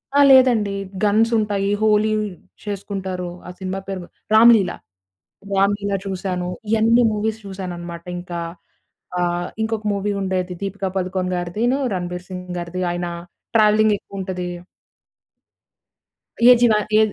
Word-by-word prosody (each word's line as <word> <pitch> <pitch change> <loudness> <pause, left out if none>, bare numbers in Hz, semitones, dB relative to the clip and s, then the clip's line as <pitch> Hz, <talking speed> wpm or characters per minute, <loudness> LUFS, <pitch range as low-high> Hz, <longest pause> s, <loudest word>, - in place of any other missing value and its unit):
ఆ! - - +5
లేదండి 240 -6 +5 0.3
గన్స్ 220 +3 +3
ఉంటాయి. 205 -2 0
'హోలీ' 215 0 +3 0.5
చేసుకుంటారు. 190 -3 -4 0.2
ఆ - - -7
సినిమా 190 0 -3
పేరు 195 -1 -4
గు - - -12 0.3
'రామ్‌లీల, 220 -4 +7 0.8
రా‌మ్‌లీల' 200 +1 +1
చూసాను. 180 -2 -3 0.2
ఇయన్నీ 225 +2 +4
మూవీస్ 220 +1 -2
చూసానన్నమాట. 175 -3 -7
ఇంకా 175 -1 -6 0.8
ఆహ్, 175 0 0
ఇంకొక 220 -1 -2
మూవీ 200 +1 -1
ఉండేది 185 -1 -1
'దీపిక 195 0 -3
పదుకోన్' 185 0 -1
గారిదిను 210 +9 0 0.2
'రణబీర్ 180 -1 -4
సింగ్' 180 -1 -6
గారిది 175 +1 -5
ఆయన 175 0 -3 0.5
ట్రావెలింగ్ 215 -1 +5
ఎక్కువ 195 0 -10
ఉంటది. 185 -1 -4 2.0
ఏ 250 - +10
జీవ 240 -2 +5 0.3
ఏ - - +6
195 Hz, 120 wpm, -21 LUFS, 180-215 Hz, 2.0 s, ఏ